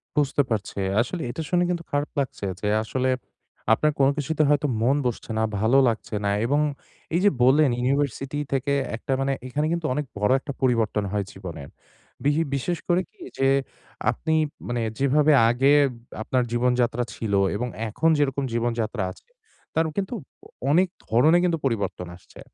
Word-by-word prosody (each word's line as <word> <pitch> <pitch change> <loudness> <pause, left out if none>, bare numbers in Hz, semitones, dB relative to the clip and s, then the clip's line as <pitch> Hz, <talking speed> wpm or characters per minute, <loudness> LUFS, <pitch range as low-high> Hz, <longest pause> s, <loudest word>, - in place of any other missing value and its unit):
বুঝতে 145 -1 +2
পারছি। 105 -2 -3 0.2
আসলে 160 +8 -3
এটা 160 - -5
শুনে 180 -1 +3
কিন্তু 170 -1 -2
খারাপ 145 +1 -1
লাগছে 130 -7 -3 0.2
যে, 105 - -1 0.2
আসলে, 130 +3 -1 0.6
আপনার 150 +6 +2
কোন 135 0 +5
কিছুতে 155 +2 0
হয়তো 145 0 +3
মন 130 +4 +3
বসছে 120 -1 -3
না, 110 - +2 0.2
ভালো 115 +5 +3
লাগছে 110 -1 -2
না 100 - +2 0.2
এবং 145 +4 +2 0.5
এইযে 200 +4 +4
বললেন 140 +2 +5
ইউনিভার্সিটি 135 +1 -1 0.2
থেকে 140 +1 0 0.2
একটা 125 - -6
মানে 135 0 +1
এখানে 150 +4 -1
কিন্তু 170 -2 -2
অনেক 150 +1 -2
বড় 105 +4 +2
একটা 140 0 -6
পরিবর্তন 115 -5 +1
হয় 105 -1 -1
জীবনের। 85 -7 -8 0.5
বি 145 - +4 0.2
বিশেষ 170 +6 -1
করে 175 +1 +3
কি 400 - -24 0.2
যে, 135 - +3 0.6
আপনি 160 - -2 0.3
মানে 120 -1 -1 0.2
যেভাবে 145 +3 +4 0.2
আগে 135 +4 +3 0.5
আপনার 125 +2 +1
জীবনযাত্রা 125 0 +1
ছিল 105 -3 -3 0.2
এবং 125 +4 -2 0.2
এখন 160 +10 +1
যেরকম 140 -1 0
জীবনযাত্রা 115 -2 -1
আছে, - - -18 0.4
তার 160 0 +2
কিন্তু 195 +4 -2 0.3
অ - - -12 0.2
অনেক 180 +4 +4 0.2
ধরনের 155 +10 +4
কিন্তু 170 -2 +2
পরিবর্তন 100 -7 -2
আসছে। - - -18
135 Hz, 160 wpm, -24 LUFS, 115-150 Hz, 0.6 s, কোন